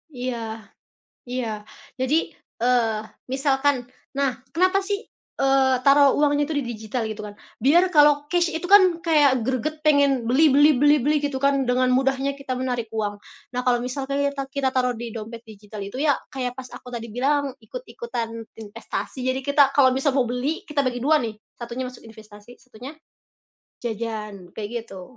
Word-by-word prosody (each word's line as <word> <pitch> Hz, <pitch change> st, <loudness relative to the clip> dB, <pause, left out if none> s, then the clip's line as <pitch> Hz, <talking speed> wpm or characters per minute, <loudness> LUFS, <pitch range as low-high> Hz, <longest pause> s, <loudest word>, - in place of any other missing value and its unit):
Iya, 230 Hz, -3 st, -4 dB, 0.7 s
iya. 250 Hz, -1 st, -2 dB, 0.5 s
Jadi, 260 Hz, +4 st, +1 dB, 0.5 s
eee, 235 Hz, -3 st, +2 dB, 0.3 s
misalkan 270 Hz, -1 st, +1 dB, 0.3 s
nah 275 Hz, -1 st, +1 dB, 0.2 s
kenapa 370 Hz, +3 st, +3 dB
sih, 405 Hz, 0 st, -1 dB, 0.4 s
eee, 270 Hz, -1 st, +4 dB
taruh 280 Hz, 0 st, +6 dB
uangnya 290 Hz, 0 st, +2 dB
itu 315 Hz, -, -4 dB
di 275 Hz, -, -1 dB
digital 220 Hz, +2 st, -4 dB
gitu 215 Hz, 0 st, -6 dB
kan? 205 Hz, -, -8 dB, 0.3 s
Biar 345 Hz, +8 st, +4 dB
kalau 295 Hz, -1 st, +5 dB
cash 345 Hz, -1 st, +2 dB
itu 325 Hz, +2 st, -3 dB
kan 370 Hz, -4 st, +6 dB
kayak 285 Hz, -6 st, +4 dB
greget 305 Hz, +4 st, -2 dB
pengen 280 Hz, -5 st, +3 dB
beli 300 Hz, +4 st, +5 dB
beli 290 Hz, -1 st, +6 dB
beli 290 Hz, +2 st, +5 dB
beli 300 Hz, +3 st, +2 dB
gitu 285 Hz, -2 st, -2 dB
kan 275 Hz, -1 st, +2 dB
dengan 255 Hz, 0 st, +2 dB
mudahnya 270 Hz, +1 st, +1 dB
kita 275 Hz, -2 st, -4 dB
menarik 245 Hz, -3 st, -2 dB
uang. 205 Hz, -2 st, -2 dB, 0.4 s
Nah 250 Hz, -, -1 dB
kalau 245 Hz, -1 st, +3 dB
misalkan 275 Hz, +2 st, -3 dB
kita 280 Hz, -1 st, -1 dB
kita 275 Hz, -2 st, +1 dB
taruh 250 Hz, -1 st, +1 dB
di 235 Hz, 0 st, -5 dB
dompet 230 Hz, +1 st, -7 dB
digital 210 Hz, -1 st, -10 dB
itu 200 Hz, +6 st, -8 dB
ya, 300 Hz, -2 st, +4 dB, 0.2 s
kayak 250 Hz, -2 st, -3 dB
pas 255 Hz, -1 st, -8 dB
aku 250 Hz, -, -13 dB
tadi 230 Hz, 0 st, -5 dB
bilang 280 Hz, +2 st, 0 dB
ikut-ikutan 475 Hz, -, -6 dB, 0.3 s
investasi, 225 Hz, +4 st, -6 dB
jadi 260 Hz, +1 st, 0 dB
kita 285 Hz, +2 st, +2 dB
kalau 265 Hz, -2 st, +6 dB
misal 270 Hz, +1 st, +1 dB
mau 255 Hz, -, +3 dB
beli 255 Hz, +6 st, -2 dB
kita 290 Hz, -1 st, +1 dB
bagi 250 Hz, -1 st, -1 dB
2, 305 Hz, +3 st, +4 dB
nih 225 Hz, -2 st, -3 dB, 0.2 s
satunya 240 Hz, +2 st, -5 dB
masuk 255 Hz, -, -14 dB
investasi 220 Hz, +1 st, -14 dB
satunya, 255 Hz, +3 st, -11 dB, 0.9 s
jajan 215 Hz, -5 st, -5 dB
kayak 210 Hz, -2 st, -5 dB, 0.2 s
gitu. 195 Hz, +3 st, -12 dB
260 Hz, 165 wpm, -23 LUFS, 235-285 Hz, 0.9 s, taruh